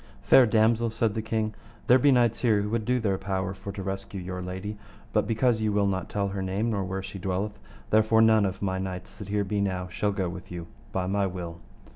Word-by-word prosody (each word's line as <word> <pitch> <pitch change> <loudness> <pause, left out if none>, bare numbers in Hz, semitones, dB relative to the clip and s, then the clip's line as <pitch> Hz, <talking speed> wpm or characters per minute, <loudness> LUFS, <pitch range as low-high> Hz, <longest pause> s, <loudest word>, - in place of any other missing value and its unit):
Fair 125 - +7
damosel, 115 +1 +3
said 110 -1 0
the 110 - -2
king, 110 -1 -1 0.3
there 125 +2 +6
be 145 - +5
knights 120 -4 +3
here 105 -4 +2
would 110 0 -1
do 125 +2 +2
their 100 -4 0
power 95 -1 -2
for 100 +1 -7
to 100 -1 -6
rescue 95 +1 -4
your 90 0 -5
lady, 95 +3 -5 0.4
but - - +2
because 115 0 +2
you 110 -1 +1
will 100 0 +2
not 95 -2 -1
tell 100 -1 -1
her 95 0 -3
name, 100 +5 -1
nor 100 -3 -1
where 95 +1 -3
she 95 0 -7
dwelleth, 95 +3 -2 0.3
therefore 110 +1 +4
none 110 -1 +5
of 95 0 -2
my 95 -1 0
knights 95 -1 -5
that 105 - -8
here 105 0 +1
be 100 +1 -1
now 95 -2 -1
shall 105 +3 0
go 95 -2 -1
with 90 0 -7
you 85 -1 -5 0.3
by 95 -1 -1
my 100 +1 +1
will. 85 -2 -6
100 Hz, 230 wpm, -27 LUFS, 95-110 Hz, 0.4 s, Fair